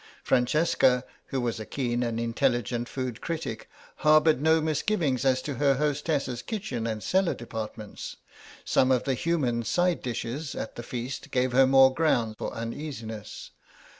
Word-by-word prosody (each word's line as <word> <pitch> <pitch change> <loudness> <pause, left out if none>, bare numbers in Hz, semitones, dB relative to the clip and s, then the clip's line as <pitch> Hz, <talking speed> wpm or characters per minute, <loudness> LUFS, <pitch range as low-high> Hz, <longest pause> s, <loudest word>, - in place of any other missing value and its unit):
Francesca, 130 -1 +3 0.2
who 135 - -2
was 120 -3 -2
a - - -4
keen 120 -3 -1
and 115 -2 -1
intelligent 120 0 0
food 130 -4 -4
critic, 155 -9 -4 0.3
harboured 155 -1 +4
no 160 +1 +4
misgivings 155 - 0
as 130 -1 +2
to 145 - -3
her 140 -2 +4
hostess's 145 -3 -1
kitchen 135 - -4
and 110 -2 -3
cellar 190 -1 +2
departments; 110 -2 -7 0.5
some 130 - +3
of 125 -2 +3
the 135 - 0
human 130 -5 0
side 175 +8 +1
dishes 125 +4 -4
at 110 - -5
the - - -5
feast 125 +2 -5
gave 125 0 +1
her 130 +1 +5
more 135 0 +6
ground 120 -8 +1
for - - -3
uneasiness. 115 -3 -6
130 Hz, 150 wpm, -27 LUFS, 120-150 Hz, 0.5 s, more